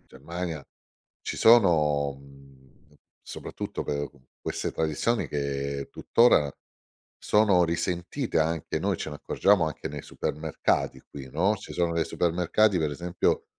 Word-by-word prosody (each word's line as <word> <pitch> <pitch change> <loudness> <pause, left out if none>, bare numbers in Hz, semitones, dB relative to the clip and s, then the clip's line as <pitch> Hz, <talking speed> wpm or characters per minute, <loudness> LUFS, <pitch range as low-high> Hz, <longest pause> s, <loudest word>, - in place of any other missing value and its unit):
in - - -35
Germania 80 +1 -6 0.6
ci - - -4
sono, 75 -11 +4
mhmm, 70 +1 -19 0.3
soprattutto - - -6
per, 75 0 -2
uhm, 65 -3 -24 0.2
queste - - -3
tradizioni 80 +9 0
che 70 -1 -3
tuttora 115 -12 +4 0.7
sono 105 -4 +4
risentite, 85 - -2
anche. 80 0 -1
Noi - - 0
ce 75 - -5
ne - - -6
accorgiamo 100 +2 +2
anche 75 - -5
nei 75 0 -7
supermercati 75 +2 -2
qui, 65 -2 -9
no? 95 +9 +2
Ci - - -10
sono 85 -1 0
dei 80 -1 +1
supermercati, 90 +4 +2
per 75 -2 0
esempio, 85 +4 -1
80 Hz, 135 wpm, -27 LUFS, 70-90 Hz, 0.7 s, sono